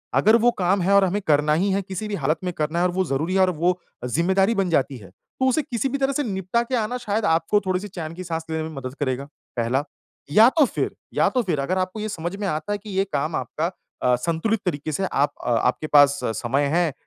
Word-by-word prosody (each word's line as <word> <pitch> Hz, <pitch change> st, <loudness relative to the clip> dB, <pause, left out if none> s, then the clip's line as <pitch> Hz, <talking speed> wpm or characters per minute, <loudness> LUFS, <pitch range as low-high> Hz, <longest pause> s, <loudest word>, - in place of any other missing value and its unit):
अगर 220 Hz, +2 st, +5 dB
वो 240 Hz, -, +6 dB
काम 185 Hz, +2 st, +2 dB
है 190 Hz, +3 st, +2 dB
और 200 Hz, -, +6 dB
हमें 195 Hz, +3 st, -1 dB
करना 150 Hz, 0 st, +3 dB
ही 200 Hz, -, +1 dB
है 195 Hz, +1 st, +1 dB
किसी 195 Hz, +2 st, -5 dB
भी 210 Hz, -, -3 dB
हालत 155 Hz, -1 st, 0 dB
में 180 Hz, -1 st, -2 dB
करना 155 Hz, +1 st, -1 dB
है 175 Hz, -, +3 dB
और 180 Hz, -, +1 dB
वो 190 Hz, +1 st, 0 dB
ज़रूरी 155 Hz, +4 st, -1 dB
है -, -, +3 dB
और 185 Hz, -, +4 dB
वो 175 Hz, +2 st, 0 dB, 0.3 s
ज़िम्मेदारी 190 Hz, -, +2 dB
बन 195 Hz, -3 st, +1 dB
जाती 140 Hz, -4 st, +1 dB
है, 100 Hz, -6 st, -13 dB, 0.3 s
तो 260 Hz, -, +3 dB
उसे 285 Hz, +5 st, +2 dB
किसी 250 Hz, +1 st, -2 dB
भी 280 Hz, -, -1 dB
तरह 275 Hz, 0 st, +1 dB
से 290 Hz, -, 0 dB
निपटा 190 Hz, 0 st, -1 dB
के 255 Hz, +2 st, -2 dB
आना 230 Hz, +1 st, -1 dB
शायद 215 Hz, -2 st, -1 dB
आपको 165 Hz, +5 st, +2 dB
थोड़ी-सी 185 Hz, +2 st, -1 dB
चैन 165 Hz, -5 st, -6 dB
की 185 Hz, -, -6 dB
सांस 165 Hz, -2 st, -4 dB
लेने 160 Hz, 0 st, -1 dB
में 160 Hz, -, -5 dB
मदद 130 Hz, -1 st, -6 dB
करेगा, 135 Hz, -1 st, -1 dB, 0.3 s
पहला, 120 Hz, +4 st, +1 dB, 0.5 s
या 220 Hz, +9 st, +7 dB
तो 295 Hz, -, +7 dB
फिर -, -, -2 dB, 0.2 s
या -, -, +3 dB
तो 255 Hz, -, +1 dB
फिर 170 Hz, -8 st, -1 dB
अगर 170 Hz, +7 st, -1 dB
आपको 185 Hz, +3 st, -2 dB
ये 215 Hz, +1 st, -3 dB
समझ 175 Hz, 0 st, -4 dB
में 200 Hz, -1 st, -2 dB
आता 155 Hz, +4 st, -2 dB
है -, -, -1 dB
कि 210 Hz, +1 st, -12 dB
ये 195 Hz, -, +4 dB
काम 150 Hz, +3 st, -1 dB
आपका 165 Hz, +3 st, -2 dB, 0.3 s
अ, 125 Hz, 0 st, +4 dB
संतुलित 170 Hz, -, -1 dB
तरीके 155 Hz, -3 st, -2 dB
से 190 Hz, +6 st, -1 dB
आप 145 Hz, -5 st, +1 dB
अ -, -, -1 dB, 0.2 s
आपके 140 Hz, +5 st, -1 dB
पास 145 Hz, -1 st, +5 dB, 0.2 s
समय 135 Hz, +4 st, 0 dB
है 170 Hz, -3 st, +2 dB
180 Hz, 255 wpm, -23 LUFS, 150-205 Hz, 0.5 s, या